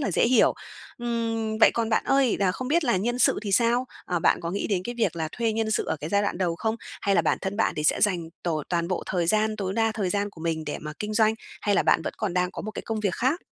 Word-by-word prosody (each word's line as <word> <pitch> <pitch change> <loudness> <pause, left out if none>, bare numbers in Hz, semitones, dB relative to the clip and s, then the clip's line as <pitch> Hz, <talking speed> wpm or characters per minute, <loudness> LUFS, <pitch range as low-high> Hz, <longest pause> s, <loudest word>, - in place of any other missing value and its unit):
là 275 - -1
dễ - - +3
hiểu. 245 0 +4 0.4
Ừm, 225 -2 -2
vậy - - +7
còn 230 -1 0
bạn 220 - +1
ơi, 270 -3 +3
là 185 -2 +2
không 255 +6 -5
biết 330 +1 +2
là 235 -6 +2
nhân 240 +6 -1
sự - - +4
thì 205 -3 -3
sao? 235 +5 +3 0.2
À, 175 -1 0
bạn - - +2
có 170 - -3
nghĩ 200 +3 -2
đến 190 -4 0
cái 240 - -4
việc 220 - +1
là 160 -1 -2
thuê 230 -2 0
nhân 220 0 -1
sự 220 - +1
ở - - -1
cái 150 +2 -6
giai 200 0 +2
đoạn 200 - -2
đầu 175 -3 0
không? 220 +3 -1 0.2
Hay 200 -2 +1
là - - +4
bản - - +1
thân 195 +1 -3
bạn 225 - +1
thì 150 - -2
sẽ - - +3
dành 175 -6 +1
tổ 155 -4 -1
toàn 170 -1 -1
bộ 185 - -2
thời 175 -2 -1
gian, 215 +3 +2
tối 190 -2 -3
đa 225 +1 +1
thời 205 -4 -2
gian 205 +1 -1
của 165 - -15
mình 160 -1 -2
để 150 - -3
mà 150 0 -6
kinh 210 0 -4
doanh, 220 0 +4 0.3
hay 205 - +1
là - - +3
bạn - - +3
vẫn - - -3
còn 200 -5 -2
đang 180 0 +1
có - - -7
một 215 - -5
cái - - -7
công 220 -1 -3
việc 200 -4 0
khác? 275 +9 0
210 Hz, 300 wpm, -25 LUFS, 180-225 Hz, 0.4 s, vậy